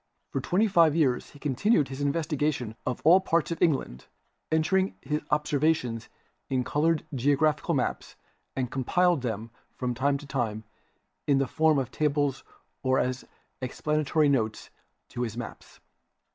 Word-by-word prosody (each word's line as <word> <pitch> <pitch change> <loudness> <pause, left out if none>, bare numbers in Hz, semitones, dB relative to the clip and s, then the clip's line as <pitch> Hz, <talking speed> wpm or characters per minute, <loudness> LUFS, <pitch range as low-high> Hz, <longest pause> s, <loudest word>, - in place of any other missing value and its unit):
For 135 - -2
twenty 190 - +2
five 165 -6 +4
years 135 -7 +1
he - - -15
continued 150 - +1
his 135 +1 -6
investigations 145 -5 -1
in 125 - 0
all 175 +5 +7
parts 170 -3 0
of 165 - -4
England, 135 - 0 0.4
entered 185 +5 +2
his 150 +3 -2
observations 150 -5 0 0.4
in 130 -1 +1
colored 155 +4 +1
geological 145 +3 +2
maps - - -2 0.4
and 125 -2 -2
compiled 175 +5 +2
them 115 -2 -4 0.2
from 125 -1 -2
time 140 +3 +1
to 145 - -11
time 115 -6 -2 0.6
in 140 -2 +4
the 135 - +2
form 155 +1 +2
of 130 -2 -1
tables 145 -2 0 0.4
or 130 0 +2
as 125 0 -1 0.4
explanatory 150 +3 +1
notes 110 -6 0 0.4
to 120 - -5
his 115 -2 -3
maps. 120 - -8
140 Hz, 145 wpm, -27 LUFS, 125-155 Hz, 0.6 s, all